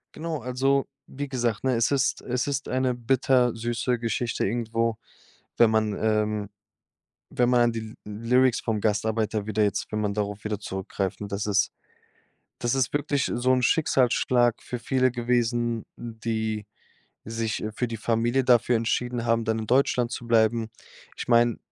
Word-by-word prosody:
Genau, 160 -1 -4
also 135 +3 +1 0.2
wie 145 +2 -6
gesagt, 120 -4 -1
ne? 130 -1 +2
Es 115 +2 +2
ist 140 -1 +1
es 125 +2 -2
ist 140 0 -2
eine 130 -1 +1
bittersüße 120 -1 +1
Geschichte 115 +1 -1
irgendwo, 115 +1 -1 0.6
wenn 115 -2 +6
man 110 -1 +1
ähm, 105 -1 0 0.8
wenn 125 0 +2
man 125 -1 +4
an 120 -1 +3
die 115 - -3 0.2
Lyr 115 +4 0
Lyrics 130 -2 +3
vom 110 -3 -1
Gastarbeiter 110 0 0
wieder 110 0 0
jetzt 100 -2 0
wenn 110 - -1
man 105 -1 -1
darauf 105 -1 -3
wieder 105 -2 -2
zurückgreift. 95 0 -4
Ne, 100 - -5
das 100 +1 -3
ist 105 -1 +2 0.9
das 120 +1 0
ist 130 -2 +1
wirklich 145 -1 0
so 125 +1 +2
'n 125 -1 +2
Schicksalsschlag 125 -4 +2
für 125 - -5
viele 130 0 +2
gewesen, 120 -1 0
n 115 -2 -8
die 110 -2 -2 0.6
sich, 115 0 -2
äh 110 0 -3
für 125 +2 -2
die 115 -1 -5
Familie 120 +3 +1
dafür 120 -1 +4
entschieden 120 +1 -1
haben, 115 -1 +2
dann 110 0 0
in 110 - -4
Deutschland 125 -1 +2
zu 120 -1 -6
bleiben. 115 0 +2 0.5
Ich - - -6
meine, 120 -1 +4
115 Hz, 165 wpm, -26 LUFS, 110-125 Hz, 0.9 s, wenn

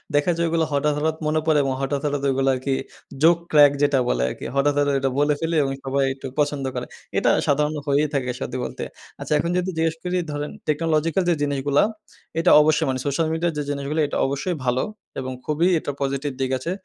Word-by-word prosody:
দেখা 145 +5 +3
যায় 170 - +1
ওগুলো 165 -1 +1
হঠাৎ, 145 +1 +1
হঠাৎ 155 +1 0
মনে 155 +1 +2
পড়ে 155 -2 +4
এবং 135 -1 0
হঠাৎ, 140 +1 -1
হঠাৎ 145 -1 -1
ওইগুলো 135 0 +1
আরকি 135 +1 -2 0.5
জোক 170 +1 +6
ক্রাক, 145 -2 +7
যেটা 145 -2 +3
বলে 60 0 +1
আরকি। - - -7
হঠাৎ, 145 +1 +3
হঠাৎ 145 -1 +2
এটা 135 0 0
বলে 145 +1 +3
ফেলে 165 0 -1
এবং 135 - -1
সবাই 135 +1 0
একটু 135 - -11
পছন্দ 145 -2 0
করে। - - -3 0.3
এটা - - +3 0.2
সাধারণ 150 +2 +2
হয়েই 145 +2 +3
থাকে 130 -3 -1
সত্যি 130 - -4
বলতে। - - -6 0.4
আচ্ছা, - - -2
এখন 170 +3 -1
যদি 180 +1 -1
জিজ্ঞেস 160 0 +1
করি 180 0 -1
ধরেন, 145 0 -4 0.2
টেকনোলজিক্যাল 165 +3 +1
যে 170 - +3
জিনিসগুলা, 145 0 +2 0.6
এটা 170 +2 +4
অবশ্যই 150 0 +3
মানে 130 0 -1
সোশ্যাল 150 +3 0
মিডিয়া 165 +1 0
যে 150 - -1
জিনিসগুলো 145 +2 -2
এটা - - -3
অবশ্যই 140 +6 -2
ভালো 125 +1 +1 0.4
এবং 130 0 -4
খুবই 155 +4 +1
এটা 145 - -4
পজিটিভ 140 +1 -1
দিক 130 0 0
আছে। 165 +7 -4
145 Hz, 205 wpm, -23 LUFS, 140-160 Hz, 0.6 s, ক্রাক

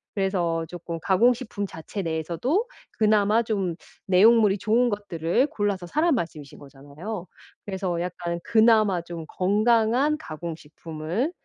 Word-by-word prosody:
그래서 175 -5 0
조금 170 -1 -7
가공식품 215 +2 +1
자체 160 +5 -6
내에서도 170 - -1 0.3
그나마 215 +1 +3
좀 195 -6 -2 0.3
내용물이 205 +2 +5
좋은 230 +5 +2
것들을 200 - 0
골라서 205 -7 -2
사란 310 - +1
말씀이신 155 - -5
거잖아요. 145 +8 -8 0.4
그래서 190 -3 -2
약간 175 -1 -4
그나마 220 -5 +4
좀 170 -1 -7
건강한 230 +8 +2
가공식품을 165 - -5
195 Hz, 305 characters per minute, -25 LUFS, 170-220 Hz, 0.4 s, 내용물이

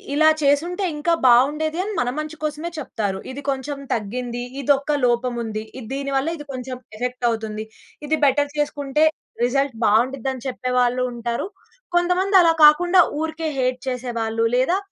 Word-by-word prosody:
ఇలా 310 +1 +6
చేసుంటే 340 +7 +1
ఇంకా 335 +3 +2
బాగుండేది 300 +7 +3
అని 425 - -4
మన 245 - 0
మంచి 305 +1 -5
కోసమే 305 +3 -3
చెప్తారు. 205 -8 -3
ఇది 280 +2 -8
కొంచెం 275 +1 -4
తగ్గింది, 240 +3 -3 0.2
ఇది 285 +2 +4
ఒక 290 +1 -1
లోపం 240 0 +1
ఉంది. 215 -1 -4 0.2
ఇది 225 - -9
దీని 275 0 -3
వల్ల 270 - 0
ఇది 295 - -10
కొంచెం 255 0 -5 0.2
ఎఫెక్ట్ 250 +1 -3
అవుతుంది. 220 -1 -4 0.4
ఇది 315 +1 +1
బెటర్ 285 +1 +2
చేసుకుంటే, 295 0 +1 0.4
రిజల్ట్ 275 0 0
బాగుండ్డిద్ది 255 +5 +2
అని 260 +1 -10
చెప్పేవాళ్ళు 250 -1 0
ఉంటారు. 235 +5 -3 0.5
కొంతమంది 360 +3 +1
అలా 330 - +5
కాకుండా 355 +4 +6 0.2
ఊరికే 320 0 -3
హేట్ 255 0 0
చేసేవాళ్ళు, 230 -3 -2
లేదా 260 +9 +2
270 Hz, 155 wpm, -22 LUFS, 245-305 Hz, 0.5 s, ఇలా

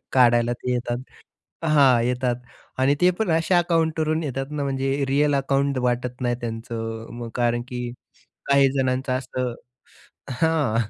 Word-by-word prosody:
काढायला 120 -2 +4
ते 125 +1 -3
येतात. 120 0 -2 0.7
हां, 135 -6 +5
येतात 125 0 0 0.4
आणि 135 +2 +3
ते 180 - +6
पण 220 - 0
अशा 165 +3 +3
अकाउंटवरून 160 -2 +1
येतात 135 0 -4
ना, 145 -1 -2
म्हणजे 135 0 -1
रिअल 145 +1 +2
अकाउंट 140 0 +1
वाटत 125 +1 -2
नाही 120 -1 +1
त्यांचं. 115 -1 -5
मग 115 - -5
कारण 120 -1 +1
की 125 0 -5 0.7
काही 140 -1 +5
जणांचं 130 -1 0
असं 125 -1 -3 0.8
हां, 145 -5 +1
130 Hz, 140 wpm, -23 LUFS, 120-145 Hz, 0.8 s, ते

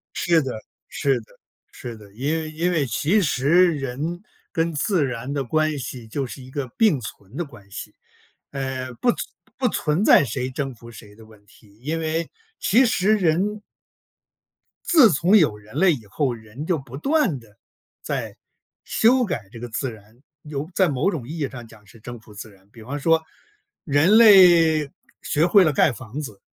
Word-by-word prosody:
是 170 -2 +2
的， 125 -5 -5 0.3
是 135 -3 0
的， 110 - -17 0.5
是 120 -2 -8
的。 105 -2 -16
因 135 +7 -2
为 160 -1 -3
因 165 +3 -1
为 155 -6 +1
其 150 - +1
实 170 +2 +3
人 150 +5 -4 0.3
跟 165 -2 0
自 165 +2 +1
然 125 +1 -4
的 140 -1 -2
关 155 +3 0
系 125 -2 -7
就 135 +5 -3
是 130 +2 -10
一 130 - -13
个 135 -1 -4
并 210 - +3
存 105 0 -10
的 175 - -2
关 115 -9 -16
系， - - -8 0.6
呃， 130 -2 -4
不 240 - +1
存 - - -11 0.4
不 255 -2 +2
存 165 -2 0
在 145 - +6
谁 130 +1 -3
征 135 0 -4
服 115 0 -14
谁 105 -2 -14
的 110 +1 -16
问 110 -2 -19
题， 105 0 -22
因 160 +4 -2
为 160 +1 -2 0.3
其 240 +7 +4
实 215 -1 +2
人 195 +3 0 1.3
自 275 - +6
从 170 +7 +4
有 150 - +3
人 105 +1 -15
类 190 -2 +4
以 120 -8 -6
后， 125 +6 -1
人 115 +6 -9
就 175 -2 +1
不 135 -2 -10
断 275 - +1
地 110 -3 -19 0.5
在 - - -4 0.5
修 250 +3 +3
改 115 - -4
这 115 - -10
个 120 - -6
自 120 +4 -3
然， 110 +2 -16 0.2
有 150 0 -5
在 190 -1 +3
某 140 +6 0
种 140 - -6
意 165 +3 -6
义 140 -3 -1
上 120 -3 -10
讲 110 -2 -18
是 110 +3 -18
征 120 +1 -9
服 110 -1 -17
自 105 +2 -9
然。 95 -1 -23
比 115 0 -14
方 135 +6 -5
说 165 +2 +2 0.6
人 155 +8 +4
类 170 -8 +6 0.3
学 155 +3 +1
会 190 +2 +6
了 155 - +2
盖 145 +1 +3
房 130 +3 -8
子， 105 -10 -8
140 Hz, 200 characters per minute, -22 LUFS, 120-170 Hz, 1.3 s, 在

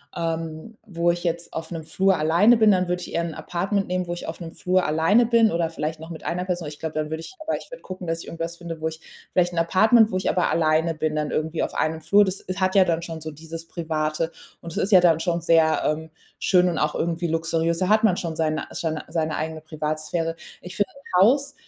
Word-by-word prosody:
ähm, 165 +5 -4
wo 175 -5 +1
ich 175 0 -4
jetzt 170 0 -2
auf 160 0 -5
'nem 165 -2 -5
Flur 190 +4 +2
alleine 170 +10 +5
bin, 220 -1 +5
dann 185 -2 +2
würde 180 0 -1
ich - - -8
eher 170 - +1
'n 165 - -5
Apartment 195 +3 -2
nehmen, 180 0 -2
wo 175 - -2
ich 175 - -7
auf 160 - -6
'nem 165 -2 -8
Flur 185 0 +1
alleine 165 +10 +3
bin 230 -1 +4
oder 170 -1 0
vielleicht 155 0 -4
noch 160 +1 -9
mit 165 -2 -9
einer 180 +2 -2
Person. 180 -2 -2
Aber - - -4
ich 150 - -15
glaube, 160 -1 -4
dann 155 -1 -1
würde 160 - -3
ich 375 - -10
aber 320 - 0
ich - - -12
würde - - -10
gucken, 185 -1 -7
dass 165 0 -1
ich - - -10
irgendwas 165 0 -5
finde, 170 -2 -7
wo 160 - 0
ich 160 0 -6 0.3
vielleicht 175 -1 +3
'n 170 - 0
Apartment, 215 +6 +5
wo 185 - 0
ich 185 - -1
aber 180 - +1
alleine 160 0 +2
bin 155 0 -1
dann 150 -1 -1
irgendwie 160 +1 -1
auf - - -4
einem 160 0 0
Flur. 205 +6 +5
Das 190 0 -3
s 185 +1 -6
hat 185 +1 +1
ja 190 -1 +6
dann 170 -1 0
schon 165 -1 -6
so 160 - -5
dieses 165 +2 -9
Private. 160 -1 -2 0.3
Und 170 - -8
es - - -7
ist 200 - 0
ja 185 - +9
dann 165 -3 +4
schon 170 0 -1
sehr, 160 -2 +3
ähm, 160 +1 -1 0.3
schön 180 -1 +4
und 170 - -2
auch 150 0 0
irgendwie 170 +1 -1
luxuriös. 165 0 0
Da 185 0 0
hat 215 +1 +4
man 190 -5 +4
schon 165 -2 -3
seine 155 -1 0
seine 160 -2 -3
seine 160 -2 -1
eigene 160 0 -3
Privatsphäre. 155 +1 -3 0.3
Ich 180 +3 -9
finde, 205 - +2
'n 230 -10 -1
Haus 275 +7 +4
170 Hz, 255 wpm, -24 LUFS, 160-185 Hz, 0.3 s, ja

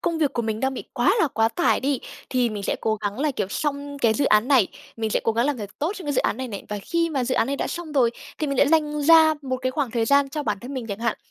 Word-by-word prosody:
công 335 -1 -1
việc 300 -4 +1
của 235 - -1
mình 220 -1 -2
đang 265 0 0
bị - - -6
quá 365 - +3
là 320 - +3
quá 225 -3 +2
tải 345 +8 +1
đi 275 -1 0 0.3
thì 250 -2 +2
mình 210 -2 -5
sẽ - - -1
cố 220 - +1
gắng 205 +2 -4
là, 300 +1 +2
kiểu, 205 -8 -3
xong 285 +2 -3
cái 230 -4 +3
dự 285 - +1
án 215 -1 +3
này, 260 -8 +5 0.3
mình 220 -1 -2
sẽ - - +1
cố 225 - +2
gắng 235 +3 +1
làm 290 -3 -1
thật 205 -2 -6
tốt 315 +6 -1
trong 365 - -8
cái 290 - 0
dự 270 - +2
án - - 0
này 260 0 -4
này. 200 -4 -7
Và 210 - -3
khi 335 +6 0
mà 270 -5 -1
dự 255 +1 -1
án 230 - +2
này 280 +2 -2
đã - - -2
xong 340 -3 -6
rồi 255 -5 +3 0.3
thì 310 - -1
mình 275 -2 -2
lại 285 - +5
dành 300 -1 +1
ra 320 +1 +7
một 260 -2 -2
cái 255 0 -2
khoảng 275 -3 -1
thời 230 0 0
gian 280 +2 +3
cho 300 +2 -4
bản 210 -6 -1
thân 260 +3 -7
mình 250 -3 -4
chẳng 200 -2 -5
hạn. 230 0 -1
265 Hz, 325 wpm, -24 LUFS, 225-295 Hz, 0.3 s, ra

